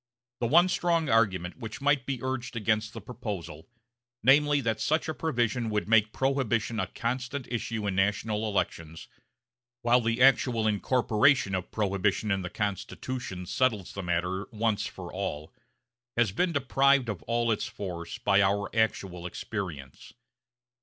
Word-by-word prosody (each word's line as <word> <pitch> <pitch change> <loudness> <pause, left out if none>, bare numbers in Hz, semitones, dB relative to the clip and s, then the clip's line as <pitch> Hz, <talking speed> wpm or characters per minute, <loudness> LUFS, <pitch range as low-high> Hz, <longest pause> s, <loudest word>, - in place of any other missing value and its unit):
The 120 - 0
one 170 +8 +6
strong 170 -4 +1
argument 95 -6 +1
which 110 -3 -7
might 140 -2 +1
be 130 -3 -3
urged 130 -1 -3
against 110 -1 0
the 115 - -7
proposal 100 -8 -7 0.5
namely 145 +3 +5
that 110 -3 -1
such 155 +2 +1
a 160 - -2
provision 120 -7 -1
would 105 -1 -1
make 110 -1 +4
Prohibition 120 -5 0
a - - -1
constant 130 +3 -3
issue 115 -2 -2
in 100 - 0
national 105 +2 0
elections, 80 -5 -3 0.8
while 120 +1 +4
the 115 +1 0
actual 125 -3 +4
incorporation 110 +2 +2
of 95 -1 -2
Prohibition 105 0 0
in 95 -1 +1
the 90 - -5
Constitution 100 0 -4
settles 105 -1 0
the 100 - -4
matter 90 +2 -1
once 110 -1 0
for 90 -2 -9
all 80 -4 -4 0.6
has 115 -4 +3
been 175 - +1
deprived 140 -2 +3
of 105 -5 -4
all 120 0 +1
its 105 - -1
force 90 -1 -6
by 105 -4 +3
our 100 +2 0
actual 95 -5 0
experience. 85 -9 -6
110 Hz, 145 wpm, -28 LUFS, 100-125 Hz, 0.8 s, one